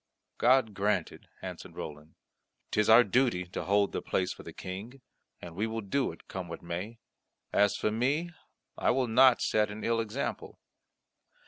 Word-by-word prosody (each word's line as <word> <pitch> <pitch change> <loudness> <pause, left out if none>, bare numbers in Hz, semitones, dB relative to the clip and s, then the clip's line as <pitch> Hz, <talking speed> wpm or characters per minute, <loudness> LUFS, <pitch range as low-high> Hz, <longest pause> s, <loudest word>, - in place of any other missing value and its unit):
"God 125 -3 +4
grant 100 +2 0
it," - - -15 0.2
answered - - -8
Roland. 75 +1 -8 0.6
"'Tis 105 0 +2
our 115 +2 +9
duty 120 -5 +1
to 90 - -5
hold 100 +1 +2
the - - -3
place 90 -1 -1
for - - -12
the - - -9
King, 105 +9 -8 0.4
and 85 - -9
we 105 +5 -1
will 115 0 -3
do 130 +7 0
it, - - -15
come 95 -2 -5
what 85 0 -8
may. 90 +7 -5 0.6
As 105 -1 +3
for 105 - 0
me, 140 +10 0 0.5
I - - +2
will 130 +1 +2
not 125 +2 +5
set 105 -1 +2
an 105 +1 -7
ill 115 0 +1
example." 110 -1 -4
105 Hz, 175 wpm, -30 LUFS, 95-120 Hz, 0.6 s, our